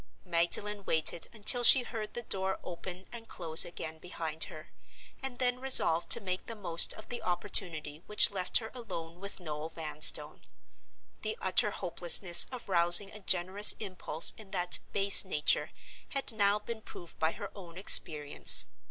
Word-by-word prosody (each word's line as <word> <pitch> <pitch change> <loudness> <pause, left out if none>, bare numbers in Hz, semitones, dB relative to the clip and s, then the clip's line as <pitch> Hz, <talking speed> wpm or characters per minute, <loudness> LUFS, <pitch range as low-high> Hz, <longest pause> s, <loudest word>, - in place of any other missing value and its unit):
Magdalen 180 +4 -2
waited 160 +1 -2
until 235 +3 -1
she 250 +2 +7
heard 220 -3 -10
the 240 - -6
door 190 -3 -5
open 180 +1 -11
and 230 -1 -12
close 165 -2 +2
again 160 -2 -8
behind 160 -2 -4
her, 155 - -15 0.5
and 265 -2 -9
then 250 0 -3
resolved 175 -11 +3
to - - +4
make 185 -2 -6
the 230 - -9
most 175 -5 0
of 215 - -15
the 245 - -8
opportunity 175 -4 -4
which 210 - +2
left 185 -2 -2
her 220 -2 -8
alone 175 -9 -11
with 200 +1 -9
Noel 155 -2 -9
Vanstone. 155 -2 0 0.8
The 215 0 -7
utter 190 +2 -1
hopelessness 175 -1 +1
of 255 -2 -11
rousing 175 +2 +6
a 210 - -12
generous 190 +1 +3
impulse 185 -5 +1
in 215 -3 -16
that 180 -1 -1
base 200 0 +3
nature 155 -6 -1 0.4
had 275 -2 -6
now 205 -2 -1
been 220 +1 -10
proved 175 -5 -15
by 160 +1 -3
her 200 - -11
own 175 -4 -14
experience. 150 -6 +4
185 Hz, 160 wpm, -28 LUFS, 170-210 Hz, 0.8 s, she